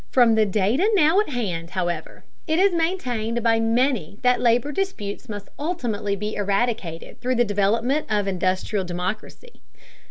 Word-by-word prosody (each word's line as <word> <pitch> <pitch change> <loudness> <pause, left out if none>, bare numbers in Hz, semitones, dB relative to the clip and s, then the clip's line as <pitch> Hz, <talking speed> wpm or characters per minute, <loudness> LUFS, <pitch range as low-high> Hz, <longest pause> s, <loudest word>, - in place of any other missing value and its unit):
From 240 -3 +5
the 220 -1 +3
data 215 - +2
now 330 +1 +4
at 425 - 0
hand, 185 - -3
however, 175 -3 -4 0.2
it 315 0 +1
is 390 +2 +4
maintained 250 -10 -1
by 225 -1 +3
many 225 - +1
that 250 0 +3
labor 245 +4 +2
disputes 295 - -4
must 205 -1 -7
ultimately 235 - -2
be 210 +2 -4
eradicated 200 -4 -2
through 255 +1 0
the 240 0 +3
development 225 +8 +1
of 205 -2 0
industrial 185 +2 -1
democracy. 185 - -6
225 Hz, 150 wpm, -23 LUFS, 200-260 Hz, 0.2 s, From